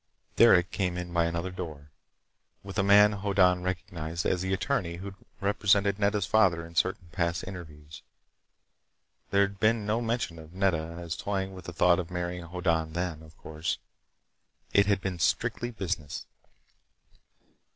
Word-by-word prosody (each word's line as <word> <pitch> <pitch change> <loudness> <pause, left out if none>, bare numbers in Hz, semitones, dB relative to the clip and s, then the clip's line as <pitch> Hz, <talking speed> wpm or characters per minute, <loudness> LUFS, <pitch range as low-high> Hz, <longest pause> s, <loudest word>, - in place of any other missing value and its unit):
Derec 90 0 +6
came 90 -3 -1
in 90 -1 -5
by 85 -1 +3
another 85 +2 -2
door, 75 -6 -7 0.7
with 100 0 -5
a - - +3
man 105 +1 +7
Hoddan 95 -3 +2
recognized 85 -2 -4
as 90 - +1
the 95 0 -2
attorney 95 -3 -1
who'd 95 +3 -7 0.3
represented 100 0 +2
Nedda's 100 -1 +1
father 90 -5 +3
in 85 - -12
certain 90 0 0
past 85 0 -1
interviews. 80 -5 -9 1.3
There'd 100 0 +2
been 110 0 +2
no 110 +3 0
mention 115 -8 -2
of 80 +1 -13
Nedda 85 -4 0
as 85 -2 -4
toying 95 +2 -3
with 95 - -10
the 90 - -6
thought 85 +2 +4
of 90 -2 -4
marrying 90 0 -4
Hoddan 85 -2 -1
then, 85 -2 -3
of 80 0 -16
course. 80 +1 -3 1.0
It 100 0 +5
had 100 -2 +2
been 95 -2 -3
strictly 120 +7 0
business. 90 -9 -4
90 Hz, 150 wpm, -28 LUFS, 85-100 Hz, 1.3 s, man